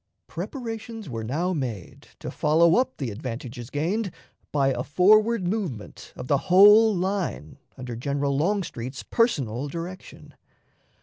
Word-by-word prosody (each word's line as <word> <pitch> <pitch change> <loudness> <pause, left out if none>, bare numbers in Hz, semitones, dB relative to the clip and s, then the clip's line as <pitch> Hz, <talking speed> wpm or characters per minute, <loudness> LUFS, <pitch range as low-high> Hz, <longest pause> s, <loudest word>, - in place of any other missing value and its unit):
Preparations 225 - -6
were 115 -1 -4
now 160 +11 -1
made 120 - -5
to - - -7
follow 165 +3 +3
up 255 +1 0
the 130 -6 -3
advantages 120 +1 -7
gained 185 +10 -1 0.4
by 140 -2 +2
a 125 -2 -1
forward 210 - +3
movement 175 - -5
of 125 - -8
the 140 0 +2
whole 210 +4 +7
line 185 - -3 0.2
under 125 -2 -6
General 140 +3 -1
Longstreet's 150 - -2
personal 140 - 0
direction. 170 +5 -8
155 Hz, 125 wpm, -25 LUFS, 130-205 Hz, 0.4 s, whole